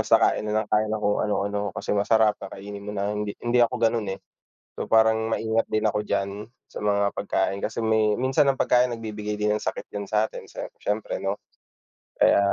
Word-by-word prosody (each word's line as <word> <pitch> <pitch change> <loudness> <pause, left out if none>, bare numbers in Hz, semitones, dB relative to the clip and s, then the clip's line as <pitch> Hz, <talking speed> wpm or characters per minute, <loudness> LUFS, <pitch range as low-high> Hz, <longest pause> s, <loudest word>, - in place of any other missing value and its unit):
basta - - +5
kain 105 - +2
na 110 +1 +1
lang - - -11
tayo 105 0 +3
ng 110 0 -2
kung 105 0 +2
ano-ano 100 0 -1 0.2
kasi - - -2
masarap 105 +1 +4
kakainin 100 +1 -8
mo 105 - -5
na, 100 +1 -1
hindi 105 -1 -3
hindi 120 +1 +2
ako 115 - +2
ganon, 115 -3 +1
eh. - - -5 0.6
So, - - -2
parang 110 0 +4
maingat 110 0 +1
din 110 0 0
ako 105 0 +1
diyan 100 +1 -3 0.2
sa - - -8
mga 100 -1 +2
pagkain 100 -1 -1
kasi 115 - -3
may 110 -1 +3
minsan 130 +3 +3
ang 135 - -2
pagkain 125 0 +4
nagbibigay 105 -2 -5
din 105 0 +1
ng - - -5
sakit - - -3
din 100 -1 -4
satin 110 +1 -1
sa - - -6 0.2
siyempre, 105 +1 -2
'no, 100 +1 -1 0.8
kaya, - - +5
105 Hz, 200 wpm, -25 LUFS, 100-110 Hz, 0.8 s, basta